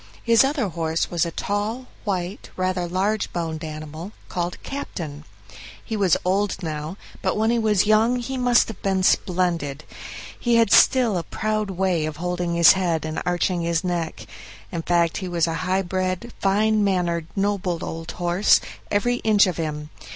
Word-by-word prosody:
His 230 0 +5
other 270 -6 0
horse 165 -1 -2
was 170 -1 +1
a - - -5
tall, 210 +8 -2 0.2
white, 185 -1 -3
rather 185 -1 -1
large 195 +5 -1
boned 165 -2 -3
animal 155 +4 -7 0.2
called 175 0 -3
"Captain". 155 - -6 0.6
He 220 - -3
was 195 -5 +3
old 190 0 0
now, 155 +2 -4 0.2
but - - 0
when 220 +2 +2
he 235 - +2
was 210 -4 +2
young 215 +3 +4
he 250 +2 -3
must 245 -2 +3
have 225 - -8
been 190 -1 0
splendid; 170 -7 +1 0.6
he 240 -1 +2
had 230 -3 +4
still 235 -8 +5
a - - -5
proud 215 +1 -2
way 180 -4 0
of 155 -1 -6
holding 175 0 -2
his 170 -1 +8
head 175 -4 -1
and 155 0 -3
arching 175 0 +1
his 170 0 0
neck; 170 -9 -3 0.5
in 170 - -3
fact, 170 -1 +1
he 185 - -4
was 170 -2 +1
a 165 - -2 0.2
high 190 +1 +2
bred, 185 +4 -2
fine 210 +2 +2
mannered, 175 -4 0
noble 195 -4 -1
old 165 0 -6
horse, 175 +3 +3 0.3
every 245 +4 +1
inch 215 -3 +4
of 180 -3 -2
him. 150 -2 -4
185 Hz, 170 wpm, -23 LUFS, 170-210 Hz, 0.6 s, his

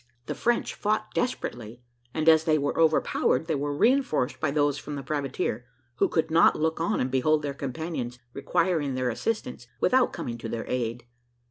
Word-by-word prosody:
The - - -3
French 240 0 0
fought 215 +1 -1
desperately, 120 - -3 0.3
and 155 +2 -2
as 160 -1 +6
they 155 -2 +3
were 145 -1 -1
overpowered, 160 0 +2
they 160 - -1
were 145 0 -1
reinforced 245 - +2
by 155 - 0
those 145 0 +1
from 145 0 -6
the 140 - -5
privateer, 135 -5 -2 0.3
who - - +2
could 160 -1 0
not 165 +1 +5
look 160 +1 0
on 165 - 0
and 125 - -1
behold 150 +4 +2
their 140 -1 -2
companions 135 -2 -4 0.2
requiring 145 -1 0
their 130 -1 0
assistance, 125 - -3
without 255 -1 +3
coming 120 -1 -5
to 115 - -6
their 115 0 -4
aid. 120 -1 -2
145 Hz, 175 wpm, -27 LUFS, 125-160 Hz, 0.3 s, as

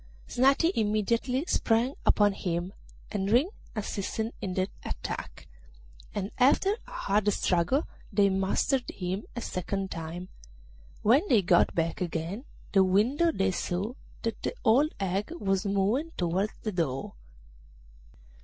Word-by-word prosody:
Snati 275 +7 +3
immediately 230 - +1
sprang 240 -5 +2
upon 205 -1 +5
him, 175 0 -3 0.4
and 195 -2 -1
Ring 255 - +4 0.2
assisted 215 +2 -3
in 185 -2 -3
the 185 0 +1 0.2
attack, - - -5 0.7
and 200 0 -2
after 290 +10 +4
a - - -12
hard 210 - +1
struggle 190 - +1 0.2
they 200 -1 +4
mastered 195 +7 +1
him 185 +2 -3
a 240 - -3
second 195 0 -3
time. 170 +2 -6 0.7
When 240 +8 +6
they 220 - +4
got 175 -1 +4
back 165 +1 -1
again 175 - -3 0.3
to 195 - +5
the - - +7
window 235 - +3
they 195 -9 +1
saw 185 +5 -2 0.3
that 230 -2 -2
the - - -2
old 275 +8 +5
hag 195 +1 -1
was 195 +1 0
moving 200 +11 +1
towards 185 +4 0
the 215 - -1
door. 150 -8 -2
200 Hz, 135 wpm, -29 LUFS, 185-240 Hz, 0.7 s, the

